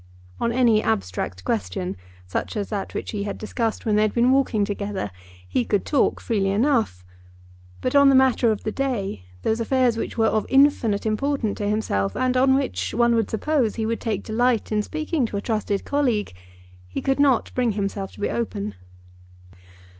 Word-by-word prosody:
On 235 - 0
any 235 -3 +4
abstract 95 - -2
question, 90 -2 -2 0.3
such 90 - -3
as 205 - -3
that 205 -3 -4
which - - -4
he 210 - -3
had 205 - -4
discussed 225 +1 -3
when 215 -2 +2
they - - +4
had 215 -1 +1
been 245 +2 +4
walking 255 -6 +2
together, 200 - -4 0.4
he 245 - 0
could 205 -3 0
talk 285 - +2
freely 200 -4 0
enough. 220 - +1 0.8
But 255 - -1
on 280 -1 +7
the 270 - +5
matter 260 -2 +4
of 215 -2 -1
the 215 - -2
day, 210 - -2 0.2
those 220 +1 +1
affairs 245 0 +2
which - - -4
were 225 - +3
of 220 -1 +1
infinite 265 -7 +3
importance 225 0 -1
to 205 -1 -1
himself, 100 - -1
and 255 0 +1
on 265 +1 +4
which 275 -1 -2
one 235 0 +4
would 225 -2 +1
suppose 250 -1 0
he 225 - -2
would 230 +1 -2
take 215 -4 -2
delight 235 +1 +1
in 210 -1 +2
speaking 310 +1 -2
to 205 - -4
a - - -2
trusted 210 -3 -2
colleague, 250 - 0 0.5
he 90 - -4
could 270 +1 0
not 275 -4 +3
bring 245 -3 +1
himself 195 -1 -3
to - - -15
be - - 0
open. 215 -3 -3
220 Hz, 185 wpm, -23 LUFS, 205-255 Hz, 0.8 s, on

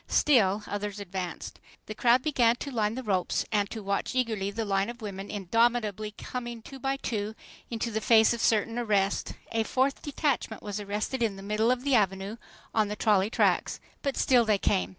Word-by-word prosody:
Still 215 -8 +3
others 205 0 -4
advanced. 185 -3 -6 0.3
The 215 - -6
crowd 240 +3 +3
began 245 -6 +3
to 280 +3 -6
line 220 -3 0
the 260 - -5
ropes 190 -5 0
and 205 -2 +1
to 220 -2 -6
watch 200 +5 -2
eagerly 220 -6 0
the 220 +2 -3
line 195 +1 +1
of 240 -1 -8
women 195 -1 -6
indomitably 215 +1 0
coming, 240 -2 -6
two 270 +2 -10
by 270 +1 -1
two, 215 -4 -3 0.3
into 230 0 -2
the 220 0 -2
face 220 0 +5
of 235 - -4
certain 225 +2 +2
arrest. 200 -4 0 0.2
A 225 - +1
fourth 265 +4 0
detachment 280 -6 -2
was 205 0 -4
arrested 210 +5 -3
in 220 -4 +1
the 195 - -10
middle 210 +3 +1
of 250 0 +1
the 280 -1 +1
Avenue 195 -1 +1 0.4
on 215 -2 +2
the 210 - -4
trolley 205 -2 +2
tracks. - - +1 0.2
But 275 -1 -2
still 250 -2 +4
they 215 -2 +2
came. 90 - +1
220 Hz, 190 wpm, -28 LUFS, 200-240 Hz, 0.4 s, face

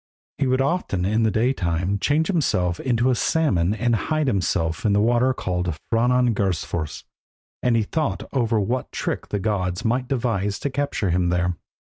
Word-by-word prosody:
He 140 - +2
would 130 +1 +2
often 135 - 0
in 110 +4 +1
the 110 - +3
day 115 +5 +2
time 90 -1 -1
change 150 +8 +2
himself 90 - 0
into 125 0 +1
a - - +3
salmon 105 - +1
and 120 +2 +1
hide 155 +6 0
in 100 - +1
the 85 +5 0
water 120 +4 +3
called 90 - -2 0.2
Franangursfors, 110 -10 0 0.6
and 125 -2 +2
he 115 - +2
thought 155 +7 -2
over 115 -4 +1
what 120 +6 -2
trick - - -3
the 105 - -2
gods 95 -3 -2
might 125 +3 0
devise 115 -7 -1
to 140 - -2
capture 130 -8 -1
him 90 0 +1
there. 90 0 +1
110 Hz, 165 wpm, -23 LUFS, 90-130 Hz, 0.6 s, the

